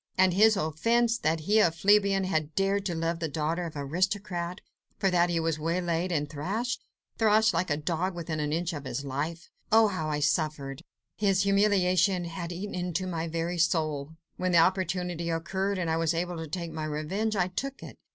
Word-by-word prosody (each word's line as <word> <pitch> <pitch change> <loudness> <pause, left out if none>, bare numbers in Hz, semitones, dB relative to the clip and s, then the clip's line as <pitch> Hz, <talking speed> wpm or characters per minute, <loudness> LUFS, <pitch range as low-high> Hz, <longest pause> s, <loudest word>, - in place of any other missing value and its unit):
And 185 -1 +4
his 215 +2 +5
offence? 230 +9 +1
That 160 -3 0
he, 210 +7 +3
a 190 - +5
plebeian, 195 +3 +3
had 155 -5 -1
dared 195 +1 +1
to 175 - -2
love 165 +1 -1
the 165 - -1
daughter 160 +4 -2
of 165 - -6
the 145 - -3
aristocrat; 180 +3 -2 0.4
for 195 -2 +1
that 175 0 +3
he 170 -1 +1
was 165 -1 -1
waylaid 170 +2 -1
and 150 -3 0
thrashed... 200 - -3 0.4
thrashed 220 -1 +4
like 170 +2 0
a 145 - +1
dog 175 +4 -2
within 165 -2 -4
an 150 0 -1
inch 170 +2 -1
of 145 -2 -6
his 140 +2 -4
life! 150 +5 -4 0.2
Oh, 220 0 +6
how 160 -5 -3
I 150 -1 -1
suffered! 150 -3 -1 0.4
his 195 -2 +2
humiliation 195 -3 +3
had 170 +1 -5
eaten 190 +4 -5
into 180 0 -2
my 170 -2 -3
very 165 +2 -2
soul! 155 -3 0 0.2
When 185 -1 0
the - - +6
opportunity 180 -1 +1
occurred, 190 +4 -1
and 175 -2 -1
I 160 0 +1
was 165 0 +1
able 175 +1 -2
to 160 0 -5
take 170 +1 -4
my 155 -1 -4
revenge, 175 +9 -2
I 180 -2 +1
took 275 +9 -5
it. - - -11
175 Hz, 200 wpm, -28 LUFS, 160-195 Hz, 0.4 s, Oh